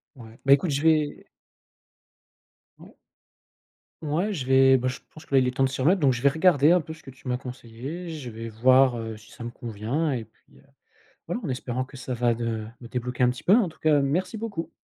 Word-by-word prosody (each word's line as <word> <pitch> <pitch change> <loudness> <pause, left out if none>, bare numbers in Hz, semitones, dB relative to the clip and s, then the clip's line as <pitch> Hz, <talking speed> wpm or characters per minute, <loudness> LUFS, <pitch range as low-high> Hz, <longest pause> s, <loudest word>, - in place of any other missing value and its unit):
Ouais. 115 -3 -13
Bah, 135 - +3
écoute 145 +4 +2
je 140 0 -1
vais 155 -2 +1 1.5
Ouais. - - -15 1.1
Ouais 165 +7 -1
je 135 -9 -4
vais, 135 0 +6
bah, 130 0 -2
je 125 - -3 0.2
pense 155 - -13
que 140 - -1
là, - - +7
il 130 - +2
est 125 - -3
temps 135 - +2
de 135 - +2
s'y 135 - -6
remettre 175 +9 +3
donc 140 -3 +4
je 120 0 -4
vais 140 - +6
regarder 160 -1 +4
un 180 0 +4
peu 160 - -9
ce 160 0 -11
que 135 - -10
tu 130 +1 -15
m'as 125 0 0
conseillé. 130 +7 -8
Je 150 -7 -7
vais 115 +1 -7
voir, 130 +3 +4
heu, 110 -1 -5
si 110 +1 -16
ça - - -10
me 120 - -5
convient 120 +7 -3
et 120 -4 -3
puis, 110 - -27
heu, - - -21 0.7
voilà, 175 +8 -2
en - - -3
espérant 130 -1 -3
que 135 +1 -13
ça 130 0 -5
va 120 0 +1
de 115 -2 -3 0.2
me 120 - -10
débloquer 125 +1 -3
un 125 - +5
petit 125 - -8
peu. 190 - +6
En 225 -5 +3
tout 160 - -15
cas, 150 -2 +3
merci 180 +9 -1
beaucoup. 210 -6 -5
135 Hz, 240 wpm, -25 LUFS, 120-155 Hz, 1.5 s, là